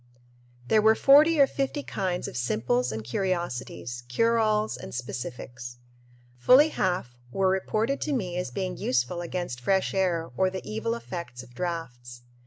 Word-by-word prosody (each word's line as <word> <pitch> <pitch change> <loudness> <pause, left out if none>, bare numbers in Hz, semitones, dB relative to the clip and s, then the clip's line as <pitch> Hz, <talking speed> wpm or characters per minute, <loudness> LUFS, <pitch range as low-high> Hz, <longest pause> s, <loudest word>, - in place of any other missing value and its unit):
There 215 - +4
were 220 +1 +5
forty 300 +5 +6
or 280 - +8
fifty 275 +2 -3
kinds 180 -2 -2
of - - -8
simples 125 +1 0
and 110 0 -5
curiosities, 125 - -3
cure 230 - +2
alls, 215 -1 +1
and - - -8
specifics. 120 -1 -6 0.6
Fully 265 - +6
half 180 - -1 0.2
were 190 +4 +2
reported 215 +7 0
to - - -2
me 190 -10 -2
as 180 -7 -2
being 185 +8 -4
"useful 125 +7 0
against 175 -7 -4
fresh 190 +9 +1
air" 175 -4 0
or 190 0 +2
the 190 0 -7
evil 220 +2 -2
effects 170 - -7
of 125 -1 -17
drafts. 120 -6 -5
180 Hz, 155 wpm, -27 LUFS, -, 0.6 s, or